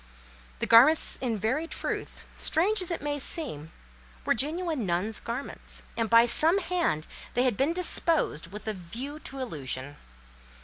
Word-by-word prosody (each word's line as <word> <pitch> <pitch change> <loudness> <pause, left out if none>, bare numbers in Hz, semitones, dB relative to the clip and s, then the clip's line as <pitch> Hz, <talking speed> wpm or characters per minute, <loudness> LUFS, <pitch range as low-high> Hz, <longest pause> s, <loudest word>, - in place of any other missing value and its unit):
The - - -1
garments 265 +8 +6
in 235 -4 -1
very 260 - -1
truth, - - -5
strange 390 +6 +1
as 365 - -3
it 340 - -4
may 290 0 -2
seem, 205 - -2 0.5
were - - +3
genuine 310 +2 +1
nun's 190 +4 -1
garments, 240 +4 -6
and 225 -1 -1
by 230 0 +6
some 320 +9 +5
hand 345 - -1 0.3
they 245 - +3
had 250 -4 +1
been 275 +8 +1
disposed 330 - 0
with 210 +5 -9
a 215 - -1
view 235 - -7
to 275 - -8
illusion. 145 - -5
255 Hz, 150 wpm, -27 LUFS, 210-320 Hz, 0.5 s, garments